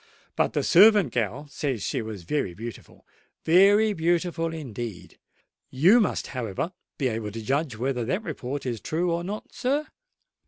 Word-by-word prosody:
But - - +1
the - - 0
servant 205 - +6
gal 120 +6 -2
says 135 -7 -3
she - - -1
was 110 -5 -7
very 90 - -2
beautiful—very 190 - +1
beautiful 165 -1 0
indeed! 115 - -7 0.5
You 175 - +5
must, 210 - 0
however, 125 - -3 0.2
be 135 - 0
able 110 -3 -3
to 115 +2 -6
judge 135 0 -1
whether 125 0 -1
that 185 - -1
report 140 - -5
is 120 -5 -3
true 170 - -1
or 170 +1 -1
not, 205 +4 -6
sir?" 280 +4 0
145 Hz, 150 wpm, -26 LUFS, 115-175 Hz, 0.5 s, servant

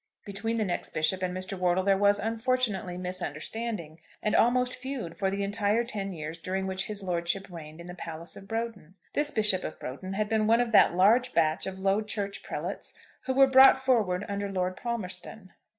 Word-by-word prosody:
Between 225 +3 -2
the 215 - +1
next 180 - -3
bishop 155 +4 +1
and 185 -1 -1
Mr. 185 +2 -4
Wortle 180 0 +1
there 195 0 +4
was, 205 +1 +4
unfortunately, 225 -4 -1
misunderstanding, 180 0 -4 0.2
and 210 - +1
almost 250 +1 +3
feud 250 -10 -5
for 195 -1 0
the 200 +1 -2
entire 205 +3 +1
ten 200 -4 -4
years 160 -1 -6
during 190 +3 -2
which 190 0 -2
his 210 -2 -4
lordship 180 +1 -1
reigned 160 -1 -9
in 170 - -9
the 180 - -8
Palace 165 -1 -7
of 195 - -11
Broughton. 225 -6 -4 0.2
This 295 0 +2
Bishop 210 -8 +2
of - - -6
Broughton 185 +9 -6
had 210 +2 0
been 215 0 +1
one 230 +1 +5
of 245 -1 0
that 205 - +6
large 230 +7 +4
batch 160 +2 +2
of 190 0 -5
Low 195 +2 +1
Church 205 -2 -4
prelates - - -5 0.3
who 260 - -1
were 270 0 +8
brought 265 0 +8
forward 220 -8 +1
under 200 0 -3
Lord 185 -1 -1
Palmerston. 195 -3 -5
195 Hz, 195 wpm, -28 LUFS, 180-225 Hz, 0.3 s, were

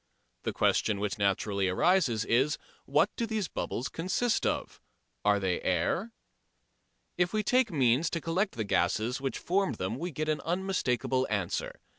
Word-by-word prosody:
The - - -2
question 105 -3 +1
which 105 0 -2
naturally 100 0 +1
arises 120 - +2
is, 135 +5 +2 0.3
What 150 +8 +3
do 230 - -1
those 215 -4 -1
bubbles 125 - -3
consist 190 +8 0
of? - - -3 0.4
Are 105 0 +4
they 95 -2 -1
air? 95 - 0 1.1
If 180 +2 +2
we 215 0 +1
take 250 0 +3
means 135 +1 +3
to 165 - -2
collect 180 +6 0
the 115 - -1
gases 110 +6 0
which 135 -3 -2
formed 185 - 0
them 100 +6 -3
we 175 - -3
get 155 0 -3
an 155 -1 0
unmistakable 150 - 0
answer. 100 -5 -2
135 Hz, 155 wpm, -30 LUFS, -, 1.1 s, Are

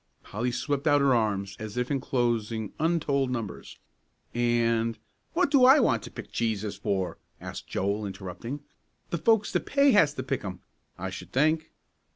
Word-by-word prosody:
Polly 120 +5 -2
swept 140 +4 -1
out 145 -1 +5
her 140 -2 +4
arms 100 -4 0
as 110 +1 -6
if 125 +2 -1
enclosing 120 -5 -1
untold 150 -5 +1
numbers. 115 -7 -5 0.6
"And 115 -1 +1 0.2
" - - -44
"What 360 +1 +2
do 275 -4 +5
I 265 +4 +8
want 115 - +3
to - - -8
pick - - -9
cheeses 110 -3 -1
for?" 95 -3 -2 0.2
asked - - -7
Joel, 100 +2 -1
interrupting. 100 +8 -6 0.5
"The 170 - -1
folks 220 +2 +3
that - - -1
pay 280 0 +4
has 155 - +4
to - - -3
pick 135 - -2
'em, 95 -3 -6 0.4
I - - -4
sh'd - - -8
think." 155 +4 +2
120 Hz, 170 wpm, -28 LUFS, 110-150 Hz, 0.6 s, I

